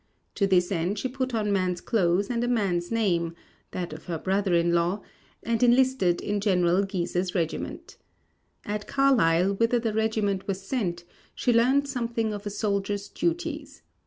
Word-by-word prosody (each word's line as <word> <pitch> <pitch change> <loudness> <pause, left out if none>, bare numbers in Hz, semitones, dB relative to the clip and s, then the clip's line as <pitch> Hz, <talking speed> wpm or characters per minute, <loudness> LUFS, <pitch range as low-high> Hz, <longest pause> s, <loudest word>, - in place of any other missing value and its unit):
To 200 - +1
this 180 -1 +2
end 180 +3 -1
she 260 - -1
put 260 -1 -3
on 210 -2 0
man's 185 -2 0
clothes 195 0 +1
and 235 0 0
a - - 0
man's 195 -7 0
name 175 -7 0 0.3
(that 175 -4 -5
of 155 - -10
her 170 -3 -3
brother 190 +1 0
in 170 0 +2
law) 175 +4 +1 0.4
and 230 0 -1
enlisted 245 -7 +3
in 205 -1 -2
General 180 -2 +3
Guise's 180 -1 -2
regiment. 165 -3 -3 0.7
At 210 0 -4
Carlisle, 200 -10 +3
whither 230 +2 +3
the 225 -2 -1
regiment 215 -3 0
was 195 -1 -2
sent 195 -6 -2 0.3
she 245 - +1
learned 260 +5 +3
something 235 -4 -2
of 205 0 -6
a - - -1
soldier's 205 -1 -2
duties. 345 +1 -3
200 Hz, 160 wpm, -26 LUFS, 180-230 Hz, 0.7 s, enlisted